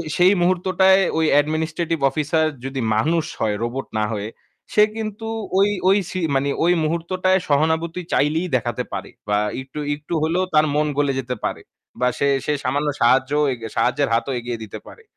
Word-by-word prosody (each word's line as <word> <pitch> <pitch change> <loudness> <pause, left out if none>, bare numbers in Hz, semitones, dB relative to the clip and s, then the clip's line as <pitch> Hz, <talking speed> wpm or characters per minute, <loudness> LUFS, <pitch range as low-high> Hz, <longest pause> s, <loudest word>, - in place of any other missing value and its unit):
সেই 180 +2 +5
মুহূর্তটায় 185 +1 +3 0.2
ওই 160 - +2 0.2
administrative 160 +1 -2
officer 155 +3 0 0.2
যদি 135 0 -3
মানুষ 160 +8 +1
হয়, 105 -2 0
রোবট 130 +3 -3
না 110 - +1
হয়ে 105 0 -3 0.5
সে 210 - +6
কিন্তু 220 0 -5 0.3
ওই 200 +1 +4 0.2
ওই 195 - +5
সি 185 - -3 0.2
মানে 140 +1 +1
ওই 175 - +4
মুহূর্তটায় 185 +4 +1
সহানুভূতি 160 +4 +1
চাইলেই 160 +5 +1
দেখাতে 120 -2 -1
পারে - - -5 0.2
বা 105 - +2 0.2
একটু 135 +3 -9 0.2
একটু 150 +3 -8
হলেও 170 +4 +1
তার 155 0 +5
মন 150 0 +2
গলে 145 -1 +2
যেতে 125 0 -3
পারে - - -2 0.4
বা 125 - +2
সে 140 - +1 0.2
সে 150 - +1
সামান্য 140 +4 0
সাহায্য 130 +3 +3 0.4
সাহায্যের 135 +3 +1
হাতও 115 +4 0
এগিয়ে 120 0 -4
দিতে 105 - -8
পারে। 455 - -14
155 Hz, 165 wpm, -21 LUFS, 135-175 Hz, 0.5 s, সে